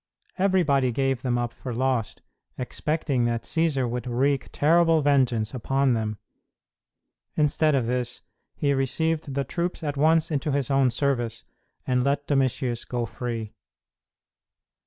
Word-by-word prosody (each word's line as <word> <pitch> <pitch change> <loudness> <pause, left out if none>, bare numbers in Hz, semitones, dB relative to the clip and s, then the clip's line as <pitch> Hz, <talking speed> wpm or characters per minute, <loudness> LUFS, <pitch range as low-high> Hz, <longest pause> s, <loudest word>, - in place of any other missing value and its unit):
Everybody 160 -10 +3
gave 135 0 0
them 125 -2 0
up 120 -1 -2
for 125 -3 -6
lost, 130 -3 -1 0.3
expecting 135 0 -1
that 115 -1 -1
Cćsar 155 -6 0
would 120 +1 -4
wreak 135 +3 0
terrible 165 0 +3
vengeance 125 -6 +2
upon 135 +1 +1
them. 110 -2 -2 1.2
Instead 150 0 +3
of 130 -4 +1
this, 120 0 -2 0.3
he 140 -2 +1
received 145 +2 -1
the 140 - +1
troops 170 +5 -3
at 145 -2 -2
once 160 +3 +3
into 145 0 -1
his 140 -1 -1
own 135 -1 +4
service 120 -3 -1 0.4
and 125 -1 +1
let 140 +1 0
Domitius 130 -3 0
go 120 -1 -2
free. 115 -2 -5
135 Hz, 135 wpm, -25 LUFS, 120-145 Hz, 1.2 s, own